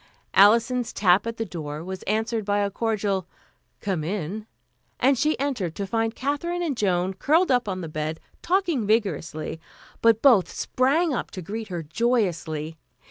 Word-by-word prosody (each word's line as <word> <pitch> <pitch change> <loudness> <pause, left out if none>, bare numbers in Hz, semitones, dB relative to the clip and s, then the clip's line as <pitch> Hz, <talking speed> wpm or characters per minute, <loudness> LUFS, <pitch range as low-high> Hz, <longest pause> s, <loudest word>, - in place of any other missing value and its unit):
Alison's 235 +4 +4
tap 195 +2 +3
at 230 0 -4
the 225 - -2
door 155 -4 -6
was 190 +1 -6
answered 220 +2 0
by 205 0 0
a 200 -1 0
cordial 200 -4 -1 0.5
"Come 190 -6 -1
in," 200 +4 -4 0.5
and 270 +2 +4
she 300 +5 +1
entered, 240 - -2
to 200 - -3
find 225 +2 -1
Katherine 340 +6 -2
and 305 -5 -1
Joan 185 -3 +1
curled 310 - +2
up 245 -4 +2
on 185 -1 -3
the 165 - -5
bed, 155 +1 -3 0.2
talking 345 - +1
vigorously, 170 -7 -1 0.4
but 230 -1 +4
both 235 -10 +6
sprang 290 +6 +1
up - - -3
to 185 - -7
greet 220 +5 -5
her 175 -4 -4
joyously. 165 -5 -1
210 Hz, 160 wpm, -25 LUFS, 180-245 Hz, 0.5 s, both